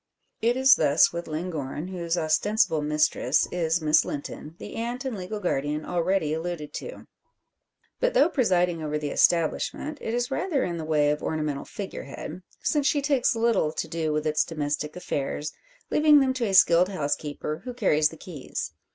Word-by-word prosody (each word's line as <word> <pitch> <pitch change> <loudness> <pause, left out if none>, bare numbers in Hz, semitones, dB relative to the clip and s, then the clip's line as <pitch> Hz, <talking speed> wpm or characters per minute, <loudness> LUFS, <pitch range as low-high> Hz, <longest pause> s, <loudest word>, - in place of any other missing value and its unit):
It 235 +2 +2
is 265 +1 +6
thus 145 +4 +4
with 170 0 -5
Llangorren, 155 -1 -4
whose 170 -2 -2
ostensible 160 +1 +2
mistress 150 +1 +1
is 170 -1 0
Miss 155 -1 +4
Linton, 150 +2 -6
the - - -9
aunt 240 +3 -4
and 260 -4 -2
legal 195 +2 -5
guardian 150 -4 -1
already 175 -2 0
alluded 160 -2 -4
to. - - -7 0.9
But, - - +1
though 290 - +6
presiding 180 - +1
over 150 -1 -2
the 150 -1 -3
establishment, 175 - +1
it 225 - -2
is 245 +1 -1
rather 300 -1 0
in 175 -1 -2
the 160 - -5
way 150 -2 +2
of 150 - -2
ornamental 150 -3 -2
figure 200 -2 -7
head; 155 +5 -8 0.2
since 290 -2 +1
she 290 -2 +1
takes 275 -5 +2
little 225 -9 +2
to - - -3
do 160 -1 -2
with 150 0 -1
its 155 0 +2
domestic 150 -1 -3
affairs, 150 -3 -3 0.4
leaving 300 -1 +6
them 265 -1 +2
to 255 -2 -1
a 195 - 0
skilled 175 0 +6
housekeeper 150 -2 -3
who 255 - -5
carries 155 -11 +2
the 160 - -12
keys. 155 -6 -6
170 Hz, 175 wpm, -26 LUFS, 150-225 Hz, 0.9 s, is